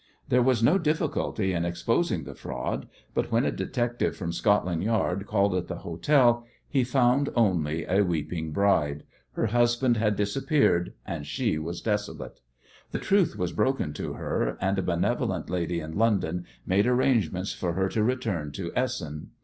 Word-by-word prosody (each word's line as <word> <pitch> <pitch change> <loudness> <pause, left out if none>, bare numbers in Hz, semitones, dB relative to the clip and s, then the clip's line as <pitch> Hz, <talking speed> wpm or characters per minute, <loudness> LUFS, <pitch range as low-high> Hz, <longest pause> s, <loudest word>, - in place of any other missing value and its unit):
There 125 - +4
was 125 -2 +2
no 160 +12 +5
difficulty 150 - 0
in 85 -1 0
exposing 85 0 0
the - - -8
fraud, 60 - -4 0.3
but - - -1
when 115 +4 +3
a - - +1
detective 120 -1 -1
from 85 - -3
Scotland 90 -3 +1
Yard 105 -3 0
called 100 -2 +2
at 90 -1 -1
the 90 - -4
hotel 120 - +3 0.2
he 135 -3 +2
found 125 +2 +2
only 85 -8 +1
a 95 +3 +2
weeping 80 -3 -2
bride. 75 -6 +1 0.3
Her - - 0
husband 120 +2 +2
had 105 -1 +2
disappeared, 105 - +1
and 80 -6 -5
she 110 - 0
was 85 +2 -5
desolate. 105 -2 -3 0.5
The - - -3
truth 195 -4 +2
was 90 -2 -1
broken 110 - 0
to - - -4
her, - - -2
and 95 +1 0
a - - +2
benevolent 85 -1 -1
lady 85 -1 -1
in 80 0 -7
London 95 -6 +1 0.2
made 100 +5 +2
arrangements 115 - +1
for 85 -2 -2
her 95 +2 +1
to 110 - 0
return 110 - -1
to 85 +1 -4
Essen. 100 - -2
100 Hz, 165 wpm, -27 LUFS, 85-120 Hz, 0.5 s, no